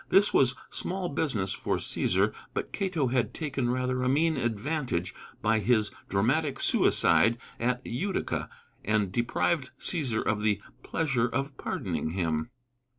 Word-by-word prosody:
This 195 +2 +5
was 130 -1 +4 0.2
small 185 -1 -3
business 110 -11 -1
for - - -1
Cæsar, - - +1 0.2
but - - -2
Cato 170 -9 0
had 125 -1 0
taken 135 -6 -1
rather 125 0 0
a 130 - +2
mean 160 +4 +3
advantage 120 - -1 0.3
by 110 +1 +3
his 110 -2 +2 0.2
dramatic 135 +8 +1
suicide 100 +8 +4 0.2
at 125 +2 0
Utica, 185 +12 -2 0.3
and 105 -2 +1
deprived 130 - 0
Cæsar 135 -11 0
of 105 -1 +1
the 105 -2 +2 0.2
"pleasure 135 -7 0
of 135 +4 -2
pardoning 80 - -3
him." 80 -4 -1
125 Hz, 135 wpm, -29 LUFS, 110-145 Hz, 0.3 s, This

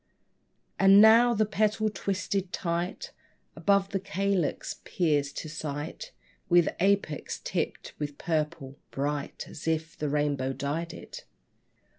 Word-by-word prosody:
And 195 +1 +8
now 230 +3 +7
the 215 0 +3
petal, 215 +1 +1
twisted 195 -2 -2
tight, 170 +1 -3 0.4
Above 200 -1 +2
the 195 - -1
calyx 195 -4 -1
peers 150 -5 +1
to - - -5
sight 150 - -5 0.4
With 175 -1 +5
apex 195 -5 0
tipped - - -3
with 145 -1 -4
purple, 150 -4 -2
bright 145 +1 -3
As 160 - -9
if 160 0 -1
the 150 - -2
rainbow 140 -2 0
dyed 155 +5 -3
it. - - -10
170 Hz, 120 wpm, -28 LUFS, 150-200 Hz, 0.4 s, And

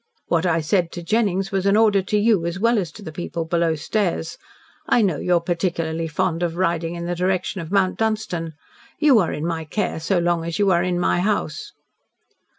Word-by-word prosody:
"What 170 +1 +1
I 165 -1 +2
said 170 +2 +1
to 175 - -6
Jennings 195 -1 0
was 195 0 0
an 200 +1 +4
order 210 -3 +4
to 210 +3 -1
you 205 -5 +2
as 170 +1 -3
well 230 +1 +3
as 175 -5 -3
to 210 - -11
the 160 - -7
people 165 0 -4
below 165 -1 +1
stairs. 170 0 -2 0.5
I 235 - +4
know 180 -7 +1
you 180 +4 +1
are - - +4
particularly 165 -1 -2
fond 165 +1 -1
of 170 -2 -1
riding 170 -2 0
in 170 0 -5
the 175 - -2
direction 185 +1 -1
of 165 +1 -8
Mount 195 -2 +1
Dunstan. 210 -7 -2 0.4
You 285 -6 +5
are 175 - +1
in 150 - -4
my 165 -1 -2
care 160 +2 -2
so 180 +4 0
long 175 -1 +1
as 170 0 -3
you 200 -2 +3
are 170 -1 +3
in 180 -1 0
my 175 - +1
house." 190 -5 -2
175 Hz, 215 wpm, -22 LUFS, 165-200 Hz, 0.5 s, You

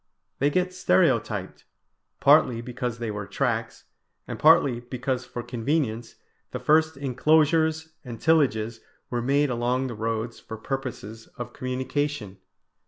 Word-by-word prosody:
They 140 - +3
get 180 +4 0
stereotyped, 95 - +1 0.6
partly 115 -2 +5
because 125 0 -4
they 115 -2 -3
were 105 -1 -5
tracks, - - -2 0.4
and - - -6
partly 150 -6 +5
because 125 +1 -3
for 120 - -6
convenience 120 -1 -2 0.3
the - - -4
first 160 0 +3
enclosures 160 +4 +2
and 120 -4 -8
tillages 115 -9 +2 0.3
were 120 -1 -1
made 140 +3 +2
along 125 +2 0
the 125 - -4
roads 115 +1 -3
for 110 - -8
purposes 115 -3 -6
of 120 0 -6
communication. 130 -4 -3
125 Hz, 125 wpm, -25 LUFS, 115-145 Hz, 0.6 s, partly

